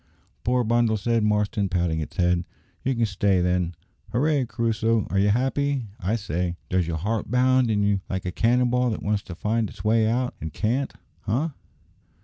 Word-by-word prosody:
"Poor 125 +1 +2
bundle!" 115 -1 +2
said 115 +2 +1
Marston, 105 -1 +1
patting 85 -3 0
its 80 +4 -6
head, 90 -1 +2 0.4
"you 135 0 0
can 115 -1 +2
stay 100 -2 +1
then. 90 -1 0 0.4
Hooray! 140 +2 +2
Crusoe, 115 -2 0
are 95 - +2
you 100 +1 +3
happy, 130 +1 0
I 105 +2 0
say? 90 -4 -2
Does 90 -2 +1
your 85 -1 -2
heart 105 +7 -2
bound 130 0 +3
in 105 -2 +2
you 100 -1 +2
like 95 -1 -3
a 90 - -1
cannon 120 +5 +2
ball 125 0 +2
that 110 - -4
wants 105 0 0
to 90 - -9
find 110 +3 0
its - - -11
way 110 0 +3
out, 125 +2 0
and 80 - -4
can't, 120 - -1 0.4
eh?" 130 +11 +1
110 Hz, 185 wpm, -25 LUFS, 95-120 Hz, 0.4 s, you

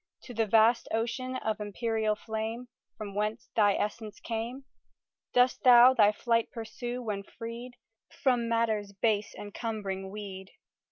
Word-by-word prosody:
To 245 - -9
the 225 -1 0
vast 225 +3 +4
ocean 240 +3 -2
of 220 -4 -2
empyreal 220 +1 -1
flame, 225 +3 -4 0.3
From 205 -2 -6
whence 215 +5 -3
thy 205 -3 +4
essence 210 0 -4
came, 235 +4 -4 0.7
Dost 250 +1 +3
thou 250 0 +8
thy 210 -4 +5
flight 230 +1 0
pursue, 240 0 -5
when 210 -3 -3
freed 230 +4 -8 0.4
From 245 -3 0
matter's 220 -3 0
base 210 +1 0
encumbering 205 -2 -5
weed? 190 -2 -8
225 Hz, 130 wpm, -29 LUFS, 210-240 Hz, 0.7 s, thou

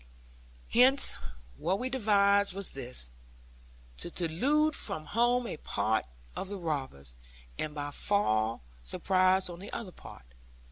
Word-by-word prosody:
Hence, 260 +4 +5 0.4
what 185 - 0
we 250 - -2
devised 200 -5 +3
was 200 -1 -3
this; 120 - -6 0.9
to - - -5
delude 265 - +1
from 155 - -4
home 240 +7 +2
a 195 - -4
part 110 - 0 0.3
of - - -4
the 200 +1 -5
robbers, 135 - -4 0.4
and 155 -1 -3 0.2
fall 115 - +1
by - - -24 0.2
surprise 185 - +2
on 175 -1 -8
the 200 - -9
other 200 -6 -5
part. 60 - -13
185 Hz, 130 wpm, -30 LUFS, 135-210 Hz, 0.9 s, Hence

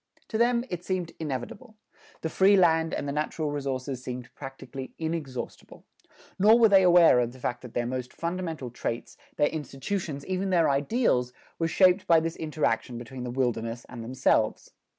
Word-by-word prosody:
To 220 - -1
them 240 0 +3
it 180 -1 -4
seemed 180 -3 -2
inevitable. 160 - -5 0.5
The 160 - -2
free 195 +3 +5
land 165 -3 +3
and - - -3
the - - -1
natural 150 +1 -2
resources 135 -2 -3
seemed 125 -1 -7
practically 135 -1 -8
inexhaustible. 160 -6 -5 0.6
Nor 215 +4 +7
were 230 -2 +6
they 195 -1 +7
aware 175 -7 +6
of 120 0 -1
the 130 - -14
fact 125 0 -3
that 125 -3 -11
their 120 - 0
most 125 0 -4
fundamental 165 -7 -4
traits, 120 -1 -4 0.2
their 145 - +3
institutions, 150 +1 -4
even 190 +1 -2
their 170 -5 +3
ideals 140 - +1 0.3
were 165 - +1
shaped 185 +2 +4
by 165 -1 +6
this 165 +1 -3
interaction 145 -6 -1
between 125 +2 -7
the 125 - -4
wilderness 120 -2 -2
and 120 -2 -7
themselves. 125 -2 +1
150 Hz, 170 wpm, -27 LUFS, 125-180 Hz, 0.6 s, Nor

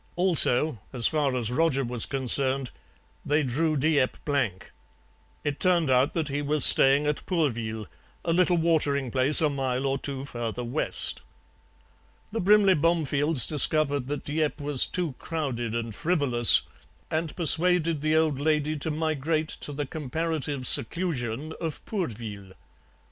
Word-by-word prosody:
Also, 160 - +4
as 120 -3 +1
far 145 -4 +1
as 120 -2 -3
Roger 140 0 +1
was 120 -2 -3
concerned, 135 0 +1 0.5
they 150 +1 0
drew 150 +4 -1
Dieppe 145 -2 +1
blank; 135 -11 -2 0.7
it 145 -1 -3
turned 175 -6 +2
out 130 +3 +2
that 160 -3 -1
he 145 0 -3
was 145 -1 +2
staying 140 +2 +6
at 150 0 -2
Pourville, 115 - -2 0.4
a 165 - 0
little 180 0 +2
watering 145 -6 0
place 135 +5 +3
a 155 - +3
mile 135 -1 -2
or 135 0 -1
two 135 -1 -4
further 120 -2 -5
west. 125 +6 -1 1.1
The 225 - -3
Brimley 200 0 +4
Bomefields 150 -4 0
discovered 145 -3 +1
that 145 +1 -5
Dieppe 150 0 -2
was 145 -3 +2
too 175 -6 -3
crowded 125 -8 -4
and 115 -1 -4
frivolous, 140 - +4 0.5
and 160 0 -3
persuaded 165 -1 +1
the 155 +1 0
old 155 -4 +1
lady 155 0 0
to 150 - -2
migrate 155 0 -2
to - - -3
the 145 0 -4
comparative 150 -1 -4
seclusion 145 -1 0
of 160 -3 -5
Pourville. 110 - -6
145 Hz, 140 wpm, -26 LUFS, 130-160 Hz, 1.1 s, staying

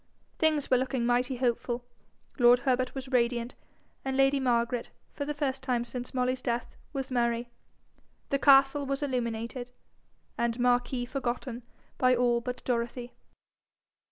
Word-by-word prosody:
Things 310 -4 +1
were 255 - +6
looking 255 -1 -1
mighty 245 +2 +1
hopeful, 245 0 -1 0.5
lord 240 0 +7
Herbert 255 0 0
was 265 -1 -6
radiant, 240 -1 +1 0.5
and 265 0 -2
lady 270 +1 +4
Margaret, 240 -2 0 0.2
for 285 - -4
the 295 - -2
first 270 -2 -1
time 250 -2 0
since 245 0 -6
Molly's 255 0 0
death, 240 -1 -2 0.2
was 270 -1 -4
merry. 240 -1 0 0.8
The 275 - +2
castle 275 0 +5
was 275 +1 -2
illuminated, 245 -1 -3 0.7
and 235 0 0
Marquis 245 0 +1
forgotten 245 -1 -3 0.4
by 255 0 +5
all 240 -1 +2
but 250 +1 -5
Dorothy. 240 0 -2
250 Hz, 135 wpm, -29 LUFS, 240-265 Hz, 0.8 s, lord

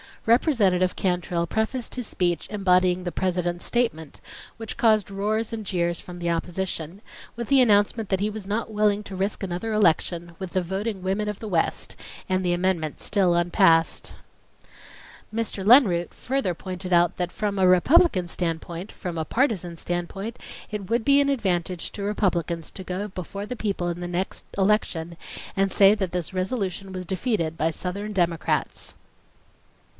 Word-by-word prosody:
Representative 205 - +3
Cantrill 175 -2 -1
prefaced 220 +5 -2
his 250 -2 -4
speech 175 -2 0
embodying 185 -3 +2
the 175 - -3
President's 175 -1 -1
statement, 160 - -1 0.4
which 225 -1 -5
caused 215 -3 +3
roars 215 +3 -1
and 220 -1 -4
jeers 175 -3 0
from 180 -1 -9
the 170 -1 -2
opposition, 170 +1 -3 0.3
with 235 -1 -5
the 275 -1 +6
announcement 210 -1 +3
that 190 - +1
he 205 +2 0
was 210 -2 -6
not 220 +2 -2
willing 210 -1 +2
to 200 - -8
risk 195 +2 -1
another 195 +4 -3
election, 175 -3 +1
with 190 -2 -6
the 185 - +2
voting 190 +3 -3
women 195 +3 -1
of 210 -1 -4
the 220 - -6
West, 170 -5 -1 0.3
and 185 0 +1
the 175 -1 +1
amendment 175 -4 -1
still 190 -4 +2
unpassed. 170 -1 +3 1.2
Mr. 220 -3 -2
Lenroot 205 -8 +5
further 260 -9 -1
pointed 185 +1 -5
out 175 +1 +4
that: 180 -1 -2
"From 205 0 -2
a 185 - +5
Republican 185 - +5
standpoint—from 170 +1 -4
a 160 - -2
partisan 185 - 0
standpoint, 175 +6 -4 0.3
it 205 -3 -5
would 230 0 +1
be 280 0 +6
an 280 - +2
advantage 185 -8 -1
to 200 - -5
Republicans 175 -5 -1
to 190 - -8
go 185 +3 -3
before 200 +1 -6
the 250 - -4
people 200 -5 -2
in 175 0 -3
the 175 - -3
next 180 +2 -3
election 190 -4 +1 0.4
and 195 -1 +1
say 195 0 +7
that 195 -5 -2
this 180 0 -3
resolution 190 0 -2
was 185 -1 -5
defeated 185 -4 -1
by 160 - +1
southern 200 +5 -3
Democrats." 170 -4 0
190 Hz, 160 wpm, -25 LUFS, 175-210 Hz, 1.2 s, say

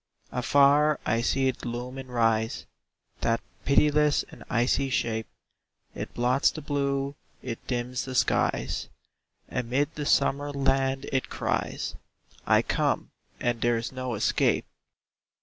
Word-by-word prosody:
Afar 140 +4 +4
I 115 +2 +1
see 135 +3 +1
it 130 - -2
loom 125 +2 -4
and 130 -1 -8
rise, 115 -2 +1 0.5
That 115 0 +1 0.3
pitiless 150 +1 +4
and - - -12
icy 125 +3 +2
shape. 110 -3 -1 0.7
It - - -6
blots 125 +3 +3
the - - -6
blue, 140 -2 -1 0.3
it 120 -3 -6
dims 125 0 -2
the 130 -1 -5
skies; - - +1 0.6
Amid 125 +5 -1
the 150 -1 -4
summer 145 +1 +2
land 135 -1 +1
it 135 -1 0
cries, - - -2 0.5
"I - - +5
come, - - 0 0.3
and 120 -1 -1
there 120 -1 +3
is 115 - -4
no 130 -2 -3
escape!" 110 +2 +2
130 Hz, 130 wpm, -27 LUFS, 120-140 Hz, 0.7 s, I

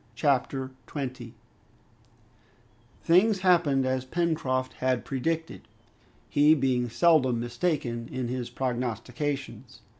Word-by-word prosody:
Chapter 135 0 0 0.2
20 130 -5 -6 1.7
Things 190 +4 +4
happened 165 -8 +3
as 130 0 0
Pencroft 130 -4 -1
had 130 -1 -1
predicted, 160 +5 -3 0.6
he 150 +2 +5
being 130 -4 0
seldom 130 -4 +3
mistaken 120 -2 -2
in 130 -2 -3
his 125 -1 -4
prognostications. 125 +3 -4
130 Hz, 90 wpm, -27 LUFS, 125-155 Hz, 1.7 s, he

